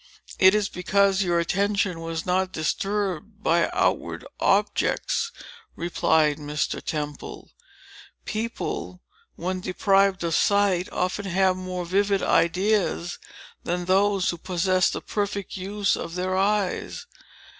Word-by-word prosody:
"It 190 +2 +7
is 210 -2 +1
because 195 +2 +2
your 175 -3 +1
attention 195 +1 0
was 165 -1 -4
not 185 +1 +1
disturbed 200 +4 -2
by 170 +1 +3
outward - - 0
objects," 460 0 +1 0.4
replied 160 -3 +2
Mr. 150 0 -2
Temple. 150 -2 -5 0.7
"People, 215 -4 -4 0.3
when 185 +2 -3
deprived 195 0 +2
of 165 -1 -1
sight, 200 -1 +2
often 185 +3 -2
have 190 0 +2
more 185 -1 -5
vivid 195 +2 +1
ideas 180 +1 +1 0.4
than 175 +1 -2
those 195 +1 +2
who 170 - -8
possess 185 +1 +1
the - - -4
perfect 200 -1 -3
use 200 +2 0
of 165 - -6
their 185 +1 -1
eyes. 200 0 0
185 Hz, 115 wpm, -25 LUFS, 175-200 Hz, 0.7 s, It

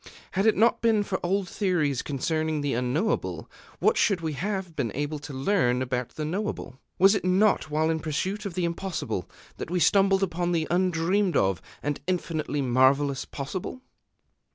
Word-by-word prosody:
Had 195 +3 +1
it 220 - +4
not 230 +3 +3
been 225 -3 +3
for 190 -2 -2
old 190 +2 0
theories 170 - 0
concerning 155 +2 -1
the 145 -1 -1
Unknowable, 125 - -1 0.3
what - - +2
should 200 -4 +3
we 160 -2 -3
have 190 +1 -3
been 125 -7 -1
able 145 +2 -2
to 145 +1 -9
learn 130 -3 +1
about 125 -1 -3
the 155 - -3
Knowable? 175 -6 -4 0.2
Was 195 +2 +6
it 205 - -1
not 185 -2 +3
while 155 +2 +1
in 160 - -1
pursuit 185 +7 -2
of 180 - -8
the 180 -2 0
Impossible 170 +1 -3 0.3
that - - -6
we 180 +1 0
stumbled 195 +3 +4
upon 175 -1 -1
the 160 -2 +1
undreamed 180 +2 +2
of 95 -2 +1 0.2
and 145 0 -2
infinitely 155 -5 -1
marvellous 130 +2 +3
Possible? 175 - -6
165 Hz, 170 wpm, -26 LUFS, 145-190 Hz, 0.3 s, Was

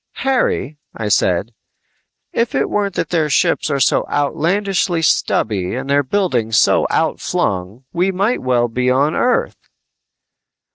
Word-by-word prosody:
"Harry," 200 - 0 0.2
I 110 -2 -3
said, 95 +3 +1 0.8
"if 230 0 -1
it - - 0
weren't 200 -2 -1
that - - -2
their 160 -3 +1
ships 145 - +1
are 140 -2 0
so 130 - +2
outlandishly 175 +4 0
stubby 100 - 0
and 130 +2 -5
their 140 +1 +3
buildings 130 - 0
so - - +3
outflung, 95 +6 -1
we 180 +3 +1
might 200 +6 0
well 125 -2 +1
be 125 +2 -1
on 140 +4 +2
Earth!" 250 - -1
140 Hz, 135 wpm, -18 LUFS, 120-185 Hz, 0.8 s, their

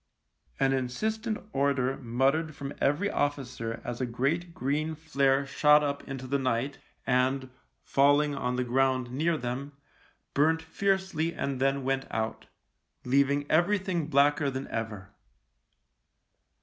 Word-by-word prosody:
An 135 0 +3
insistent 215 - -1 0.2
order 135 -1 +1
muttered 135 +6 0
from 140 0 -6
every 150 +9 +2
officer 125 -5 -2
as 120 +1 -5
a 130 - 0
great 140 +9 -1
green 155 +2 -1
flare 140 -3 +1
shot 150 +2 +4
up 145 -1 -1
into 135 -1 -6
the 140 +2 0
night 130 +2 -1 0.3
and, 130 +1 +1 0.3
falling 145 +2 +3
on 125 -2 -2
the 125 - 0
ground 130 0 +1
near 160 +5 +1
them, 135 +3 -4 0.6
burnt 160 +3 +3
fiercely 190 -1 0
and 140 -2 -2
then 135 0 +1
went 135 +1 -1
out, 110 0 -3 0.6
leaving 140 +2 +2
everything 175 -1 +2
blacker 145 0 +3
than 130 0 -4
ever. 105 -3 -5
140 Hz, 125 wpm, -29 LUFS, 130-155 Hz, 0.6 s, shot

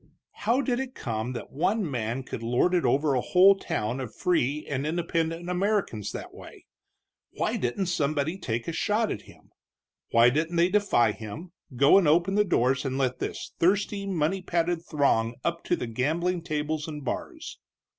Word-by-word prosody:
How 235 +6 +1
did 250 -3 -1
it 265 -1 -5
come 115 +1 -3
that 120 - -7
one 185 +8 0
man 120 -1 -3
could 120 - -6
lord 120 +10 +1
it 175 -5 +2
over 140 +4 +2
a 125 - +1
whole 190 +6 +6
town 125 - -3
of 120 -5 -6
free 150 -4 0
and 140 +1 -2
independent 165 0 -1
Americans 180 - -1
that - - -7
way? - - -13 0.7
Why - - -1
didn't 125 +11 -1
somebody 155 -1 0
take 120 -7 -3
a - - -1
shot 215 +6 0
at 105 - -4
him? - - -19 0.6
Why 115 +1 +5
didn't 160 +5 -1
they 170 +1 +4
defy 185 - +3
him, 110 - -8 0.2
go 140 +9 +6
and 180 - +1
open 170 +5 +3
the 210 +1 +4
doors 130 -8 +1
and 135 -2 -2
let 130 -2 0
this - - -5
thirsty, 200 +2 +1
money 185 0 0
padded 175 -1 0
throng 130 -8 +1
up 170 0 -2
to 175 - +2
the 125 - -4
gambling 160 +10 -1
tables 155 -1 -2
and 150 -3 -7
bars? - - -5
155 Hz, 175 wpm, -27 LUFS, 125-180 Hz, 0.7 s, whole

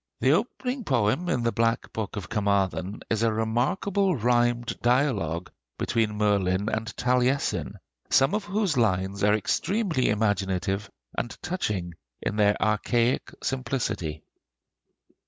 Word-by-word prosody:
The 130 - +3
opening 250 - -1
poem 130 - +1
in 125 -9 0
the 115 - +2
'Black 115 0 0
Book 110 -3 -4
of 100 -4 -5
Carmarthen' 100 -2 0
is 110 -1 +1
a 115 -1 +3
remarkable 160 - +1
rhymed 120 0 +1
dialogue 115 - +1 0.3
between 110 -3 0
Merlin 100 -1 +1
and 110 0 -2
Taliesin, 125 +2 +1 0.3
some 135 +5 +4
of 210 -1 -1
whose 205 -3 0
lines 100 -3 +1
are 105 +1 +5
extremely 180 - 0
imaginative 100 -2 0 0.3
and 120 - -4
touching 105 - -2 0.3
in 105 - -2
their 105 -1 +3
archaic 115 +3 +1
simplicity. 120 - -2
115 Hz, 120 wpm, -26 LUFS, 100-135 Hz, 0.3 s, are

